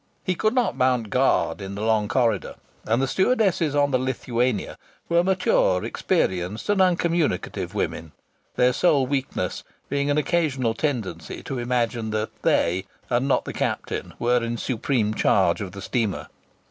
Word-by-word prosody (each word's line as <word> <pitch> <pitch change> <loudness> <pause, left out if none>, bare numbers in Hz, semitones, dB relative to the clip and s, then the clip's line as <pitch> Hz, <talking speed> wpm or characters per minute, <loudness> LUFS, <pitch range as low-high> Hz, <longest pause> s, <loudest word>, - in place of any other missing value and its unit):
He 185 - 0
could 215 +6 0
not 250 -2 +1
mount 125 -4 +1
guard 130 -4 +2
in 95 0 -6
the 105 - -4
long 110 -2 +2
corridor; 120 -1 0 0.3
and 115 +3 +2
the 135 - +1
stewardesses 190 - +2
on 145 0 +3
the 130 - +2
Lithuania 125 -4 -1 0.3
were 170 0 +3
mature, 180 - +2
experienced 95 +3 -1
and 205 -2 +3
uncommunicative 170 - 0
women, 80 -1 -3 0.4
their 125 0 +3
sole 150 -3 +3
weakness 135 0 -2 0.3
being 140 +1 0
an 145 - +2
occasional 145 -7 +1
tendency 115 - -3
to 135 -3 -4
imagine 120 -2 -1
that 110 0 -2
they, 90 +3 +1 0.3
and 125 +3 +2
not 140 - +2
the - - -5
captain, - - -3
were 120 0 +2
in 115 0 -2
supreme 115 -3 0
charge 95 -3 +2
of 95 -2 -5
the 100 -1 -8
steamer. 110 -6 -2
125 Hz, 155 wpm, -24 LUFS, 110-145 Hz, 0.4 s, on